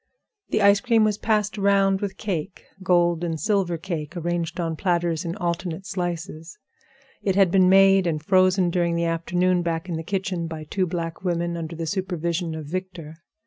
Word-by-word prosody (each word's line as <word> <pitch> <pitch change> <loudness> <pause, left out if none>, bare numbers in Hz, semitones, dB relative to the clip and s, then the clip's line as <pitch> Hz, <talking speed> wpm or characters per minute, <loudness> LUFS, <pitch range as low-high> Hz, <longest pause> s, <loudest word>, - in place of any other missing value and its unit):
The 215 - +1
ice 200 0 +6
cream 230 0 +3
was 210 -1 +1
passed 210 -1 0
around 195 -1 +3
with 195 -2 -4
cake—gold 175 -2 -1
and 165 -2 -2
silver 190 -1 0
cake 165 -1 -5
arranged 175 0 -2
on 165 -2 -1
platters 170 -2 0
in 170 +1 -3
alternate 175 +1 -3
slices; 175 -3 -5 0.6
it 195 -2 0
had 195 -3 +4
been 185 -1 +5
made 195 -1 +5
and 155 -2 0
frozen 185 -1 +3
during 170 -1 +1
the 170 0 0
afternoon 175 +2 +1
back 165 0 -2
of 165 - -2
the 160 - -5
kitchen 185 -2 -2
by 160 -1 -6
two 185 +4 -1
black 165 0 -4
women, 170 -1 -1
under 165 0 -5
the 165 0 -4
supervision 170 -2 -2
of 155 -1 -6
Victor. 170 -1 -6
175 Hz, 175 wpm, -24 LUFS, 165-190 Hz, 0.6 s, ice